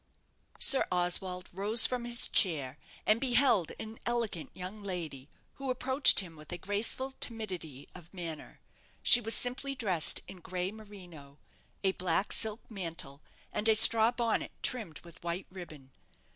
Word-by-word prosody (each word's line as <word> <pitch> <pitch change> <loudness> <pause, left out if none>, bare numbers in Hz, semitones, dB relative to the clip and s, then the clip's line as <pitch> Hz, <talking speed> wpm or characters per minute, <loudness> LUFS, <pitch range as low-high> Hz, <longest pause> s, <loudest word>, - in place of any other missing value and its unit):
Sir 270 - +6
Oswald 180 0 -1
rose 210 +5 +5
from 250 -2 -3
his 240 -1 +1
chair, 150 -7 +1 0.3
and 215 +2 +1
beheld 245 - +2
an 220 +1 -9
elegant 230 -8 -3
young 185 +3 -8
lady, 160 -8 -7 0.3
who 275 -1 -6
approached 260 -1 +4
him 170 -4 -11
with 150 -1 -13
a 175 - -4
graceful 210 +8 -2
timidity 185 - -5
of 175 -2 -14
manner. 170 -5 -9 0.4
She 240 - +7
was 225 0 +1
simply 265 +3 -1
dressed 185 - +4
in 185 - -11
gray 180 +2 -5
merino, 180 -10 -14 0.5
a 190 - +2
black 185 +1 -2
silk 220 +1 -2
mantle, 165 -8 -6 0.3
and 220 - 0
a 220 - +4
straw 225 +1 +6
bonnet, 235 -2 -2
trimmed 215 -12 -2
with 170 -1 -16
white 170 +2 -4
ribbon. 155 -8 -12
190 Hz, 145 wpm, -30 LUFS, 170-225 Hz, 0.5 s, She